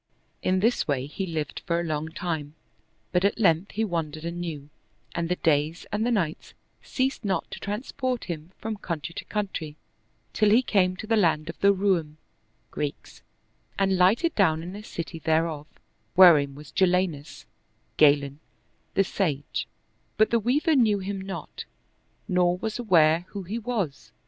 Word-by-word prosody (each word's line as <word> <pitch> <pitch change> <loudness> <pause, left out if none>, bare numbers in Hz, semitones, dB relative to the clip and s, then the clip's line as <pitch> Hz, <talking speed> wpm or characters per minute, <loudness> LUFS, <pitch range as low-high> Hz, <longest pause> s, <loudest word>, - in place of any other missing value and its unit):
In 185 0 +1
this 230 +4 +2
way 135 -3 0
he 190 +7 -5
lived 155 -4 -4
for 170 -1 +1
a - - -1
long 155 -1 -2
time, 160 -4 -4 0.6
but 180 +1 +2
at 200 - +1
length 180 -3 +2
he 220 - 0
wandered 160 -4 -3
anew, 165 -4 -5 0.4
and 170 0 -2
the 180 - +2
days 155 0 0
and 210 +1 0
the 240 - +1
nights 180 -10 -2 0.3
ceased 265 -1 -2
not 190 -5 -1
to - - -6
transport 250 +4 -3
him 165 -1 -6
from 220 -1 -4
country 170 -5 -5
to - - -7
country, 190 -8 -4 0.6
till 215 -1 +3
he 230 +5 +5
came 185 -5 +2
to 200 - -7
the 225 +1 +2
land 165 -6 +2
of - - -26
the 200 - +5
Roum 185 -6 0 0.5
(Greeks) 145 -1 -5 0.6
and 195 -1 +2
lighted 205 - +3
down 160 -5 +2
in 180 +3 -7
a 205 - -7
city 170 -5 -6
thereof, 160 -1 0 0.5
wherein 155 -7 +7
was 150 0 -12
Jalinus 180 -5 0 0.5
(Galen) 145 -1 +4 0.6
the 195 - +4
sage; 150 -8 -2 0.5
but 215 0 +4
the 230 - +4
Weaver 290 - +2
knew 220 -6 +4
him 195 0 -4
not, 190 0 -7 0.6
nor 180 -2 +2
was 220 +5 -4
aware 170 -6 +4
who 200 -2 -6
he 210 +6 -4
was. 210 - -3
180 Hz, 160 wpm, -26 LUFS, 155-205 Hz, 0.6 s, wherein